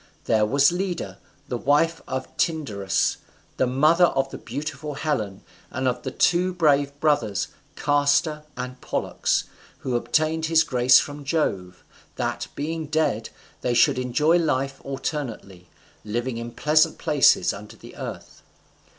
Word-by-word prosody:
There 110 -1 +3
was 140 +6 +4
Leda, 180 -1 -3 0.3
the 125 -3 -3
wife 165 +6 +2
of 130 0 -3
Tyndarus, 105 - 0 0.4
the 130 - +2
mother 155 +7 +4
of 135 -4 0
the - - -7
beautiful 145 +3 -5
Helen, 110 -11 -2 0.3
and 130 +1 -2
of 125 - -1
the - - -4
two 180 +1 +2
brave 145 -4 +2
brothers 145 -10 +1 0.3
Castor 145 +2 +2 0.2
and 125 0 -6
Pollux, - - -1 0.4
who 130 -2 -2
obtained 155 +7 +1
this 160 0 +4
grace 125 0 +5
from 145 0 -2
Jove, 95 - -2 0.3
that, - - -3
being 160 +2 -3
dead, 145 -8 0 0.3
they 120 - 0
should 125 - +4
enjoy 150 +7 +2
life 135 -4 -1
alternately, 125 - -5 0.4
living 120 +3 -3
in 115 0 -6
pleasant 155 +5 +3
places 145 -3 +3
under 105 +1 -10
the - - -14
earth. - - -8
140 Hz, 135 wpm, -24 LUFS, 120-155 Hz, 0.4 s, grace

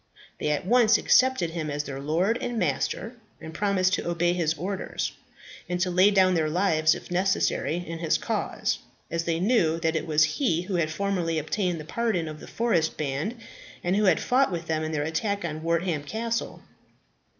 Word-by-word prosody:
They - - -1
at 150 +3 -1
once 230 0 +5
accepted 255 -10 +3
him 160 -2 -3
as 145 0 -2
their 135 -2 -6
lord 170 - 0
and 240 -1 -3
master, 190 - -1 0.2
and 160 0 -9
promised 190 0 +1
to - - -1
obey 175 0 +1
his 165 -3 0
orders, 190 +5 -3 0.6
and 180 0 -1
to 185 -1 +1
lay 185 +3 +5
down 190 -2 +4
their 160 -3 +1
lives, 160 -2 +2
if - - -10
necessary, 185 -3 +1
in 165 0 -5
his 165 -2 +1
cause, - - -2 0.3
as 165 0 -1
they 165 -1 0
knew 175 -6 +2
that 160 0 +1
it 160 - -2
was 155 -1 +4
he 165 - +1
who 190 +2 -5
had 160 -2 +1
formally 175 -1 -1
obtained 175 +2 -1
the 155 - -8
pardon 210 -4 -1
of 155 0 -7
the - - -11
forest 200 -9 0
band, 150 - -2 0.5
and 180 +2 +1
who 210 +1 +2
had 185 -4 +4
fought 260 -2 +2
with 170 -1 -4
them 155 -1 -1
in 155 - -3
their 150 -2 -1
attack 200 +5 -2
on 155 -1 -4
Wortham 170 -1 0
Castle. 230 +7 -3
170 Hz, 195 wpm, -26 LUFS, 155-200 Hz, 0.6 s, once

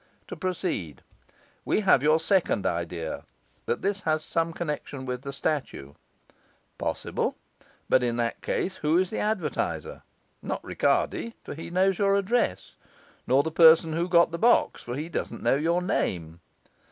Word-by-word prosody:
To - - -5
proceed, 170 - -3 0.6
we - - +1
have 190 -10 +4
your 155 +2 +4
second 170 - +1
idea, 85 -1 -3 0.4
that - - -1
this 200 0 0
has 155 -2 0
some 165 0 0
connection 150 -5 -5
with 125 -1 -4
the 140 0 -6
statue. 135 - -3 0.9
Possible; - - -2 0.5
but 130 - +4
in 120 -1 0
that 115 -1 -2
case 190 0 -2
who 155 +2 +2
is 185 0 +1
the - - -3
advertiser? 210 -8 -2 0.4
Not - - -4
Ricardi, 230 - 0
for - - -7
he 160 +3 -8
knows 185 +1 +2
your 200 -1 +3
address; 200 - 0 0.5
not 135 +3 +4
the 160 - -3
person 160 0 +6
who 170 +3 -1
got 170 -1 +5
the 170 - -4
box, 240 +2 +3
for 120 - -5
he 150 +4 -4
doesn't 170 - -5
know - - +3
your 170 +5 +1
name. 85 - -2
160 Hz, 155 wpm, -27 LUFS, 130-185 Hz, 0.9 s, person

